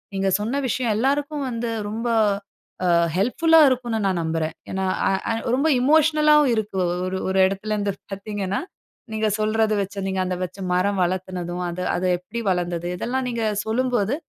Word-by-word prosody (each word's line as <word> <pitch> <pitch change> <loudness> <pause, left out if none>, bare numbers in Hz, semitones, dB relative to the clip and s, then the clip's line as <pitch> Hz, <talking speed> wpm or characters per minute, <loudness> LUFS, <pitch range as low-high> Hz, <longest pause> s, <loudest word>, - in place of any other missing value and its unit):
நீங்க 195 0 +1
சொன்ன 240 +7 -1
விஷயம் 240 -3 0
எல்லாருக்கும் 285 +3 0
வந்து 230 -1 -3 0.2
ரொம்ப 230 +3 -3 0.8
ஆ - - +2 0.3
ஹெல்ப்ஃபுல்லா 320 - +3
இருக்குன்னு 245 -3 0
நான் 190 -2 +1
நம்புறேன். 160 0 -2 0.2
ஏனா 190 0 -1 0.2
ஆ - - +3 0.2
ஆ - - +1 0.2
ரொம்ப 280 +4 +1
எமோஷனல் 305 +2 +4
ஆவும் 295 -4 +5
இருக்கு. 215 -3 -2 0.3
ஒரு 185 0 -2
ஒரு 190 0 +1
இடத்துலருந்து 205 +1 -2 0.2
பார்த்தீங்கன்னா, 200 -1 -3 0.5
நீங்க 220 0 0
சொல்றது 215 0 +1
வைச்சு, 200 0 -3
நீங்க 190 0 -2
அந்த 185 0 -2
வைச்ச 185 +1 -5 0.2
மரம் 190 +2 +1
வளர்த்துனதும் 180 -1 -3
அது 180 +1 -4
அது 185 +1 0
எப்பிடி 210 +7 -6
வளர்ந்தது? 175 -1 -1
இதெல்லாம் 260 +5 -2
நீங்க 235 -2 -2 0.2
சொல்லும்போது. 240 0 0
210 Hz, 155 wpm, -23 LUFS, 185-245 Hz, 0.8 s, ஆவும்